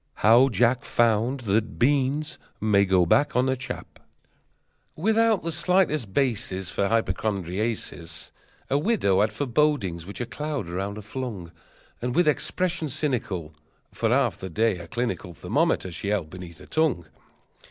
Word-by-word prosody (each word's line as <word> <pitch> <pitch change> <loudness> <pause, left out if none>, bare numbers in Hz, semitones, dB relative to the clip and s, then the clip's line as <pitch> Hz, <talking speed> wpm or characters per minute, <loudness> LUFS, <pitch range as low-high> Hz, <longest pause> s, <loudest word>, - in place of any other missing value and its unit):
How 120 +5 +7
Jack 120 +1 +2
Found 120 +3 +1
that 110 0 0
Beans 145 +4 +1 0.2
May 100 -2 +3
go 95 -2 +3
Back 145 - +2
on 125 +1 +3
a 130 - +1
Chap 130 - -7 1.0
Without 220 +4 +2
the 165 - -2
slightest 160 - +1
basis 105 -7 -1
For 100 -1 0
hypochondriasis 95 -5 -2 0.4
A 140 - +3
widow 145 - +2
had 105 +1 +2
forebodings 115 - 0
which 100 - -8
a 120 - -2
cloud 145 - -4
around 95 +4 -3
her 105 - -8
flung, 110 -7 -6 0.5
And 125 +1 -2
with 175 -2 +3
expression 165 +2 0
cynical 115 - -2 0.4
For - - -1
half - - +2
the 95 - -6
day 105 +2 +1
a 85 - -9
clinical 120 -7 -3
Thermometer 95 - 0
she 85 +4 -5
held 100 -6 -1
beneath 90 -3 -9
her - - -13
tongue. 150 - 0
115 Hz, 145 wpm, -25 LUFS, 95-145 Hz, 1.0 s, How